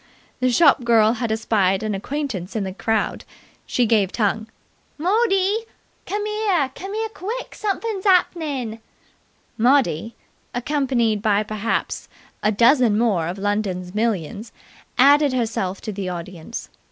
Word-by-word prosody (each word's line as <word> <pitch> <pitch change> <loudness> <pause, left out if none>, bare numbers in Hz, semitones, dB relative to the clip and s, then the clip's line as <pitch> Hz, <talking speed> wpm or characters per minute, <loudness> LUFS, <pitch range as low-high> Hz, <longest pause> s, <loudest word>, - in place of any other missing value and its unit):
The 255 0 +2
shop 275 0 +5
girl 225 -2 +4
had 235 -2 -2
espied 215 -3 +1
an 215 -1 -1
acquaintance 230 - -4
in 215 - 0
the 190 -1 -4
crowd. 220 +2 -1 0.4
She 245 - +2
gave 210 -4 +2
tongue. 220 0 0 0.5
"Mordee! 395 +4 +2 0.4
Cummere! 415 -8 0
Cummere 430 +6 -4
quick! 445 +6 -5
Sumfin' 420 0 -2
hap'nin'!" 300 - +1 0.8
Maudie, 235 - +2 0.4
accompanied 245 -5 0
by 210 -1 +2
perhaps 215 +1 -3 0.3
a 210 - +2
dozen 235 0 +4
more 205 -8 +1
of 175 +3 -4
London's 195 -3 -2
millions, 210 -1 -2 0.5
added 285 +1 +5
herself 220 -6 -2
to 215 - -4
the 195 -2 -4
audience. 175 +3 -7
230 Hz, 120 wpm, -22 LUFS, 205-295 Hz, 0.8 s, shop